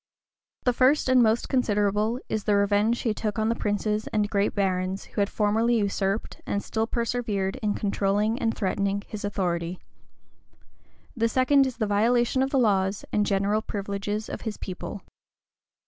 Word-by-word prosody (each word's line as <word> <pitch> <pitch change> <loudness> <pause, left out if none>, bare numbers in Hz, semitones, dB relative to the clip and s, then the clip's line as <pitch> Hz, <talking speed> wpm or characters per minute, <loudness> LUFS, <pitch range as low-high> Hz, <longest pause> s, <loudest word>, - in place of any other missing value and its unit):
The 250 - +2
first 265 +5 +3
and 260 -1 +5
most 225 0 +2
considerable 210 -2 +1
is 215 -2 -3
the 205 - +3
revenge 205 +2 +3
which - - -6
he 225 - 0
took 210 0 -3
on 220 0 +1
the 230 - +1
princes 210 0 -1
and 210 -1 0
great 200 0 +1
barons 190 -1 -1
who - - -3
had 200 - +1
formerly 225 +3 +1
usurped, 200 0 -1
and 200 - -1
still 225 0 -1
persevered 230 -5 -1
in 210 -2 -1
controlling 205 +3 0
and 230 -3 +1
threatening 200 0 -1
his 215 -2 -7
authority; 180 -3 -2 1.4
the 230 -1 +1
second 270 +2 +4
is 255 - -6
the 220 - 0
violation 240 +5 +2
of 265 - +1
the 275 - 0
laws 195 -4 +1
and 210 -1 +2
general 200 +2 +1
privileges 205 +1 -4
of - - -6
his 220 -2 -4
people. 185 +1 -7
210 Hz, 165 wpm, -26 LUFS, 200-230 Hz, 1.4 s, and